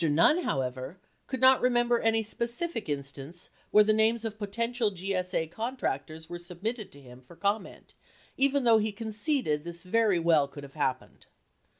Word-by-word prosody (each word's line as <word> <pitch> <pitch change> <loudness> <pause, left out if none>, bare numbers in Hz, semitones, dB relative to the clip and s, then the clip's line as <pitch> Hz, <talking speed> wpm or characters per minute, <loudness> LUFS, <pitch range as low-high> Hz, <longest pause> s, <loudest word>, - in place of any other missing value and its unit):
Nunn, 165 - +4
however, 130 - -3 0.3
could 260 - -3
not 260 0 +6
remember 240 -1 +3
any 225 0 +2
specific 235 - -3
instance 140 +4 -6 0.2
where 210 - +7
the 215 +1 +3
names 220 +1 +2
of 220 -1 -5
potential 230 +2 -1
GSA 185 -3 -2
contractors 160 - -4
were 175 +1 -6
submitted 195 +6 -5
to 140 - -13
him 125 -1 -14
for 130 +7 -16
com 200 +4 +1
ment, - - -14 0.4
even 275 0 +2
though 230 -2 +6
he 215 0 -1
conceded 215 - -1
this 170 +1 -8
very 210 0 +2
well 165 -4 +3
could 145 +1 -10
have 140 -1 -11
happened. 130 -4 -3
200 Hz, 165 wpm, -29 LUFS, 160-230 Hz, 0.4 s, where